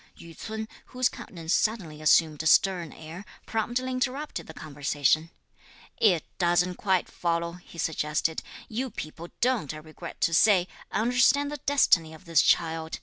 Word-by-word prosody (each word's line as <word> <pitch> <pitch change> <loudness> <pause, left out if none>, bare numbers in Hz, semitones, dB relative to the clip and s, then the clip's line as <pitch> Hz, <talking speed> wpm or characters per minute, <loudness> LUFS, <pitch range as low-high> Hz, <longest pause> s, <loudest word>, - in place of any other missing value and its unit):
Yü 170 -1 -12
ts'un, 220 0 -5 0.2
whose 255 0 +1
countenance 165 -1 -5
suddenly 180 -9 0
assumed 155 -1 +4
a 160 - -1
stern 175 -1 +3
air, 160 +4 -9 0.2
promptly 240 +3 -1
interrupted 260 +4 -3
the 160 - -9
conversation. 145 +1 0 0.7
"It 180 -8 +3 0.2
doesn't 175 0 +2
quite 190 -3 +1
follow," 170 -1 -1
he - - -15
suggested. 160 0 -1 0.3
"You 255 +4 -3
people 165 -4 -7
don't, 235 - +1
I - - -7
regret 155 +2 -10
to 165 - +2
say, 185 0 +5 0.2
understand 245 +5 +3
the 295 - -4
destiny 170 - +3
of 185 - -17
this 165 -3 +4
child. 160 -1 +1
170 Hz, 145 wpm, -27 LUFS, 160-220 Hz, 0.7 s, say